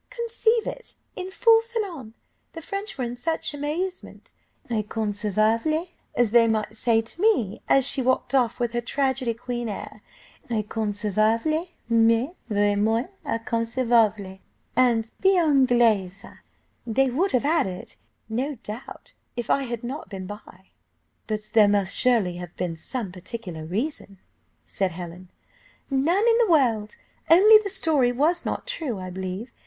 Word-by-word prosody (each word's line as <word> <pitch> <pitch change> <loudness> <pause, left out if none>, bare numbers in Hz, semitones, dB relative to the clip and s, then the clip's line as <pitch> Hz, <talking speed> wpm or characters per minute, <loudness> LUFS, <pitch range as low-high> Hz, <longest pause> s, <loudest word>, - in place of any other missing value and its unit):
Conceive 465 -2 0
it, - - -6 0.2
in 370 0 -5
full 455 +3 +5
salon! 390 - -5 0.4
The 330 - -7
French 395 +2 -5
were 260 - -2
in 240 0 -4
such 320 +5 -2
amazement. 320 +6 -4 0.3
'Inconceivable!' 220 - 0 0.3
as 240 -3 +2
they 235 0 +6
might 215 -1 0
well - - -17
say 225 0 +2
to 280 +10 -8
me, 240 - +2
as 270 -2 +5
she 275 -1 +2
walked 255 0 0
off 250 -3 +2
with 240 -1 0
her 240 - 0
tragedy 260 -1 -1
queen 240 -1 -4
air; 210 +1 -7 0.5
'Inconcevable 220 - 0 0.2
mais, 230 +4 +3 0.2
vraiment 210 - +1
inconcevable;' 230 -4 0 0.4
and 230 -3 +2
'Bien 385 -1 +4 0.3
Anglaise,' 210 -6 +2 0.6
they 260 +3 +2
would 355 +10 0
have 255 +2 +2
added, 285 - -1 0.3
no 255 +6 -2
doubt, 245 - -9 0.2
if 240 -2 -3
I 275 - +2
had 235 -2 -5
not 265 +6 -6
been 190 -2 -6
by." 190 -2 -11 0.6
"But 215 -1 -4
there 215 -2 +6
must 200 -2 +1
surely 225 -9 +2
have 175 -1 -9
been 175 -2 -3
some 205 +4 -5
particular 180 -3 -7
reason," 200 - -4 0.5
said 190 -3 -1
Helen. 175 +1 -9 0.6
"None 335 - +2
in 460 -1 +5
the 460 -4 +3
world, 230 -10 +2 0.3
only 420 +6 +8
the 400 - -3
story 315 -10 +2
was 300 +8 +1
not - - -3
true, 320 - -3
I 185 -1 -6
believe. 190 +5 -5
235 Hz, 140 wpm, -24 LUFS, 210-300 Hz, 0.6 s, only